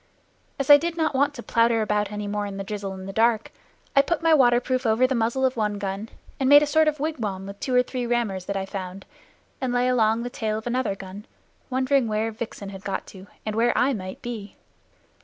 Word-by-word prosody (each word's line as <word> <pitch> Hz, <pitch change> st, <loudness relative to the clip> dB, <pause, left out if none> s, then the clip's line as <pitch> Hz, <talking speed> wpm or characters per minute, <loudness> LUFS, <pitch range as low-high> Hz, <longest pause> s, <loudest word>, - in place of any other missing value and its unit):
As 275 Hz, +1 st, +2 dB
I 290 Hz, -, +11 dB
did 340 Hz, +2 st, -3 dB
not 315 Hz, -2 st, +1 dB
want 285 Hz, +2 st, +1 dB
to 240 Hz, -, -8 dB
plowter 230 Hz, -1 st, +2 dB
about 210 Hz, -1 st, 0 dB
any 210 Hz, 0 st, -4 dB
more 205 Hz, 0 st, -2 dB
in 195 Hz, -1 st, -6 dB
the 195 Hz, -, -4 dB
drizzle 200 Hz, -1 st, -5 dB
and 190 Hz, 0 st, -8 dB
the 195 Hz, -, -6 dB
dark, 225 Hz, +1 st, +2 dB, 0.4 s
I 275 Hz, -, +8 dB
put 340 Hz, +3 st, -2 dB
my 330 Hz, -1 st, +5 dB
waterproof 255 Hz, -2 st, +3 dB
over 225 Hz, +1 st, +3 dB
the 260 Hz, -, +1 dB
muzzle 235 Hz, +2 st, +1 dB
of 260 Hz, -, +1 dB
one 210 Hz, -2 st, -1 dB
gun, 200 Hz, +2 st, -4 dB, 0.3 s
and 265 Hz, -1 st, +2 dB
made 290 Hz, +1 st, +8 dB
a -, -, +2 dB
sort 315 Hz, +1 st, +3 dB
of 305 Hz, -1 st, 0 dB
wigwam 225 Hz, -11 st, -3 dB
with 200 Hz, +1 st, -9 dB
two 255 Hz, -, -1 dB
or 250 Hz, -, +5 dB
three 250 Hz, -1 st, -4 dB
rammers 220 Hz, -6 st, -1 dB
that 200 Hz, 0 st, -2 dB
I 190 Hz, -, -2 dB
found, 190 Hz, 0 st, -7 dB, 0.6 s
and 260 Hz, -2 st, -1 dB
lay 245 Hz, 0 st, +2 dB
along 230 Hz, -2 st, +2 dB
the 245 Hz, -, -5 dB
tail 215 Hz, -2 st, -2 dB
of 220 Hz, -, -7 dB
another 245 Hz, -4 st, -1 dB
gun, 195 Hz, +2 st, -10 dB, 0.4 s
wondering 260 Hz, -1 st, +2 dB
where 220 Hz, +1 st, -1 dB
Vixen 220 Hz, -3 st, -7 dB
had 195 Hz, -1 st, -10 dB
got 195 Hz, -2 st, -3 dB
to, 190 Hz, 0 st, -12 dB, 0.2 s
and 215 Hz, -1 st, -3 dB
where 235 Hz, +2 st, +2 dB
I 270 Hz, +2 st, +3 dB
might 185 Hz, -4 st, -7 dB
be. 220 Hz, -5 st, -6 dB
225 Hz, 230 wpm, -24 LUFS, 205-255 Hz, 0.6 s, I